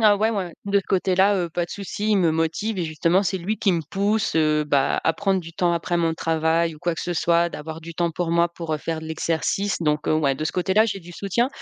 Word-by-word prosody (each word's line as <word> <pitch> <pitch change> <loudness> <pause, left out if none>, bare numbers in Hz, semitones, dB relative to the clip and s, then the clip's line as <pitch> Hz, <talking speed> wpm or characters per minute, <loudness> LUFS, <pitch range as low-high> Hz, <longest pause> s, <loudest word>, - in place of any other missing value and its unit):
Ah, 205 -1 +6
ouais, 220 - +2
ouais, 195 -6 -2
de 200 0 +3
ce 195 - -4
côté 185 0 +1
là, 195 +2 +4
heu, 175 -2 -1
pas 175 +1 -2
de 175 - -13
souci. 205 +2 -3
Il 210 - +4
me 170 -3 +3
motive 165 +7 -1
et 175 - 0
justement, 165 +4 +1
c'est 190 0 -1
lui 205 +5 -2
qui 195 -4 +2
me 170 - 0
pousse, 200 +7 -1
heu, 155 -1 +3
bah, 140 -2 +1
à 160 - +2
prendre 195 -2 0
du 165 -1 -11
temps 175 -1 +1
après 170 +1 -1
mon 165 -1 +1
travail 160 0 0
ou - - -14
quoi 170 +1 -1
que - - -5
ce 175 - -3
soit, 170 +1 +2
d'avoir 160 0 -7
du 165 0 -9
temps 170 0 0
pour 170 0 -2
moi 170 0 +2
pour, 165 -2 -4
heu, - - 0
faire 160 +2 -4
de 160 - -8
l'exercice. 165 +5 -1
Donc 150 -2 0
heu, - - +2
ouais, 140 -3 +2
de 155 - -4
ce - - -2
côté-là, 190 +4 +3
j'ai 195 -3 -3
du 175 0 -12
soutien. 205 +8 0
170 Hz, 280 wpm, -23 LUFS, 160-195 Hz, -, Ah